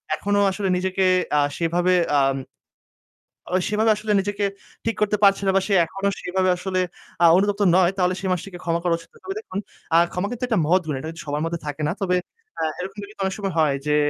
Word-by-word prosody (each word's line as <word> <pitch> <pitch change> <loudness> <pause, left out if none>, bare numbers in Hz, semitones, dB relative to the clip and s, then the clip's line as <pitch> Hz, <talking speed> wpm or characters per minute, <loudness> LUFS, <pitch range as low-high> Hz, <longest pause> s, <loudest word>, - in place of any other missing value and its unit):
এখনও 205 0 +1
আসলে 195 0 -2
নিজেকে 190 +1 0 0.3
আ - - +5 0.2
সেভাবে 175 +2 +1 0.3
আম 135 0 +2 1.2
ওই 185 - +3
সেভাবে 215 +1 +3
আসলে 210 0 -3
নিজেকে 205 +1 -1 0.4
ঠিক 225 - 0
করতে 210 0 +2
পারছে 195 -1 +5
না। - - +5
বা 195 - +4
সে 205 - +1
এখনও 195 +4 -2
সেভাবে 185 +1 0
আসলে 185 +1 -2 0.4
আ - - +8
অনুতপ্ত 205 +1 +1
নয় 185 -1 +4
তাহলে 180 -1 +2
সে 190 - -7
মানুষটিকে 180 0 -4
ক্ষমা 170 0 0
করা 175 -1 +2
উচিত 165 0 -16
নয়। - - -20
তবে 385 - -5
দেখুন, 410 - -5 0.4
আ - - +8 0.2
ক্ষমা 180 +3 -1
কিন্তু 245 +1 -5
একটা 225 -6 +1
মহৎ 180 +4 +3
গুণ। 150 -3 -2
এটা 155 - -6
কিন্তু 165 - -9
সবার 145 0 -2
মধ্যে 165 0 -3
থাকে 145 +1 -4
না। - - 0
তবে 180 -2 +2 0.4
আ - - 0 0.2
এরকম 190 +3 -6
কিন্তু 210 - -11
অনেক 190 0 0
সময় 195 -3 -3
হয় 150 -3 +3
যে, 150 0 +2
190 Hz, 215 wpm, -23 LUFS, 170-200 Hz, 1.2 s, আ